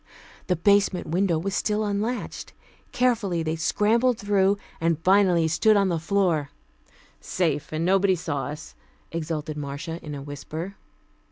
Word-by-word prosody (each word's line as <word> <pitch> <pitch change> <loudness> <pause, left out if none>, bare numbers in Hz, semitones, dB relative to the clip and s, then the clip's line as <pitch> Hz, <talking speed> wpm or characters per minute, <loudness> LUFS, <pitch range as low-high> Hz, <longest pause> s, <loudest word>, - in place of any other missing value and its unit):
The 180 - +2
basement 200 +1 +2
window 175 0 +1
was 190 +5 -3
still 210 +2 0
unlatched. 210 +4 -3 0.4
Carefully 205 -9 +1
they 160 0 -1
scrambled 220 +9 +2
through, 200 -1 +2 0.2
and 165 -1 +1
finally 185 -4 +4
stood 210 +7 +3
on 195 -1 +3
the 170 -2 0
floor 170 -4 +1 0.7
"Safe, 155 -5 -1
and 155 +1 -1
nobody 190 +1 +3
saw 160 -5 -3
us," 150 +1 -8 0.4
exulted 155 -2 -4
Marcia 150 +4 -5
in 150 -1 -6
a 140 - -7
whisper. 155 +6 -6
175 Hz, 140 wpm, -25 LUFS, 160-200 Hz, 0.7 s, finally